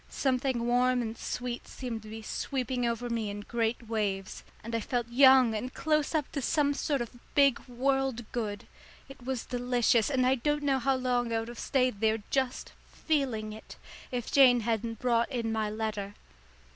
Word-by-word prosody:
Something 255 -2 0
warm 245 +1 +2
and 225 0 -4
sweet 245 +1 -5
seemed 240 -4 -5
to 215 - -12
be 220 0 -8
sweeping 250 +1 -2
over 235 +1 -2
me 230 -3 -2
in 205 0 -5
great 230 +2 -2
waves, 200 -4 -2 0.2
and 230 +1 -7
I 230 - +1
felt 240 +2 -2
young 260 -1 +6
and 250 +4 -3
close 305 +1 0
up 300 -3 -1
to 280 - -3
some 285 +1 +2
sort 280 -1 -1
of 240 +1 -7 0.2
big 280 -3 +5
world 265 -1 0
good. 210 -4 -3 0.4
It 270 -2 -13
was 260 -1 -3
delicious, 245 -2 +2
and 260 -3 +2
I 255 - +4
don't 295 +3 0
know 275 -2 +2
how 270 +1 +2
long 245 -2 0
I 225 - +1
would 225 +1 -3
have 240 - -9
stayed 255 -6 +1
there 220 0 +2
just 260 -2 -1 0.2
feeling 250 -9 -1
it 220 - -11 0.4
if 245 -2 -3
Jane 255 -4 +6
hadn't 225 0 -2
brought 235 0 +1
in 230 -3 -2
my 220 -1 -1
letter. 210 -2 -4
245 Hz, 185 wpm, -29 LUFS, 225-265 Hz, 0.4 s, young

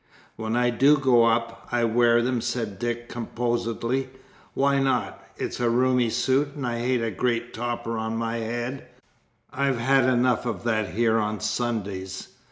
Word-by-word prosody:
"When 110 +1 -3
I 120 0 +2
do 140 +6 +5
go 125 -4 +4
up, 115 0 0
I 120 -1 +1
wear 120 +1 +4
them," 125 -1 0
said 110 -6 -3
Dick 120 0 -3
composedly. 120 +2 -2 0.5
"Why 140 0 +2
not? 135 -1 -1
It's - - -4
a 120 -1 +2
roomy 125 0 +2
suit, 130 +5 +1
and 140 -3 -4
I 120 -1 -2
hate 125 0 0
a 115 - -1
great 120 +3 -1
topper 115 -1 -3
on 110 0 -2
my 115 0 -2
head; 120 +3 -4 0.7
I've 140 -2 +1
had 130 +2 +3
enough 125 -1 +2
of 105 -6 -4
that 110 -6 -1
here 115 0 +3
on 105 0 -2
Sundays. 105 -4 -3
120 Hz, 165 wpm, -25 LUFS, 115-125 Hz, 0.7 s, do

